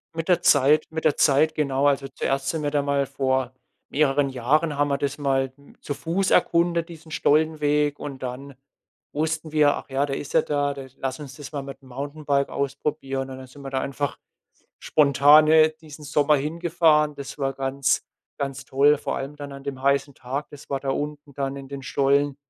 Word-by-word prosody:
Mit 165 +2 -4
der 175 -1 +4
Zeit 145 +2 +4
mit 160 0 -5
der 155 - +3
Zeit, 155 +2 +4
genau. 140 -1 +1
Also 135 -1 +1
zuerst 135 0 -2
sind 160 -2 -2
wir 145 - -1
da 145 -1 +2
mal 140 -1 0
vor 130 -1 -1 0.4
mehreren 140 -1 +2
Jahren 145 +5 +1
haben 145 0 +2
wir 140 - +1
das 140 0 -2
mal 135 -2 0
m 140 - -20
zu 145 - -4
Fuß 175 +6 -1
erkundet, 170 0 +2
diesen 160 -1 -12
Stollenweg 150 -1 +2
und 135 -3 -7
dann 130 +2 -6 0.6
wussten 155 +1 -2
wir: 150 -2 +4
„Ach - - -9
ja, 135 +1 +1
der 135 -1 -3
ist 140 - -7
ja - - +5
da 145 -1 -1
da 135 -1 -8
lass 130 +1 -4
uns 140 -3 -9
das 145 0 -9
mal 140 -2 -4
mit 135 0 -9
dem 130 - -17
Mountainbike 140 +1 -2
ausprobieren.“ 135 -1 -3
Und 130 - -7
dann 130 - -10
sind 140 +3 -14
wir 135 - -5
da 135 - 0
einfach 140 0 -3 0.6
spontan, 150 +1 +5
äh, 155 0 +6
diesen 150 -1 -12
Sommer 150 +1 +3
hingefahren. 155 0 +2
Das 140 +1 -8
war 135 -1 0
ganz 135 0 0 0.4
ganz 140 -1 -4
toll, 140 +2 +3
vor - - -3
allem 140 +2 -5
dann 145 -1 -8
an 140 0 -9
dem 135 -2 -5
heißen 140 0 +1
Tag. 135 +4 -5
Das 145 -1 -13
war 135 -1 -1
da 135 - -2
unten 145 0 -4
dann 140 -1 -3
in 135 -1 -9
den 140 -1 -7
Stollen 140 +1 +1
140 Hz, 205 wpm, -24 LUFS, 135-150 Hz, 0.6 s, äh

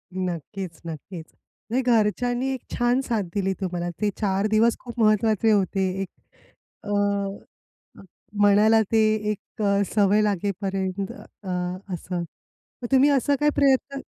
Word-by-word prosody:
नक्कीच, 180 0 -5
नक्कीच. 165 +1 -7 0.4
म्हणजे 250 +4 +1
घरच्यांनी 240 +3 +1
एक 260 - -4 0.2
छान 240 +2 +2
साथ 230 -5 -1
दिली 195 -1 0
तुम्हाला. 175 -2 -2
ते 210 - +2
4 195 -1 0
दिवस 225 +2 +3
खूप 240 -1 -9
महत्त्वाचे 215 0 +3
होते. 195 -2 +1
एक 195 - -4 0.7
अ - - -8 1.5
म्हणायला 210 +2 +5
ते 225 - +3 0.3
एक 215 +2 -7 0.3
सवय 205 0 +4
लागेपर्यंत 195 -1 -2
अ, 195 - -12 0.4
असं. 175 0 -4 0.6
मग 240 - -4
तुम्ही 270 +2 +5
असं 285 0 +2
काय 295 - +3
प्रयत्न 275 -1 +2
210 Hz, 125 wpm, -24 LUFS, 190-235 Hz, 1.5 s, म्हणायला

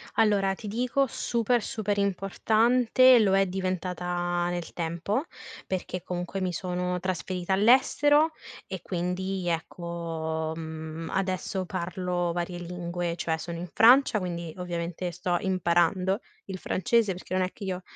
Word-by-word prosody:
Allora, 205 -3 +3
ti 215 - -9
dico 250 +6 +1
super, 235 +1 0
super 210 -1 -2
importante 225 +6 +4
lo 195 -3 +4
è 195 0 +4
diventata 180 -1 -2
nel 175 -1 -4
tempo, 170 - -2 0.4
perché 185 -1 -3
comunque 180 +2 -4
mi 185 -1 -1
sono 180 +2 -2
trasferita 185 0 -2
all'estero 290 +8 +4 0.4
e, 190 -2 -5
quindi, 180 +1 -2
ecco, 165 -1 -3
mhmm, 160 0 -6
adesso 190 0 -1
parlo 180 -1 -2
varie 175 +1 -3
lingue, 175 0 -3
cioè 165 -1 -1
sono 170 +1 -6
in 175 +1 -5
Francia, 245 -1 +6
quindi 170 -3 -4
ovviamente 175 0 -3
sto 180 +1 -1
imparando 185 0 +2 0.3
il 190 -1 -5
francese 210 +4 +1
perché 185 +1 -8
non 185 0 +2
è 185 - -2
che 205 - -11
io 185 -1 -3
180 Hz, 135 wpm, -27 LUFS, 175-195 Hz, 0.4 s, Francia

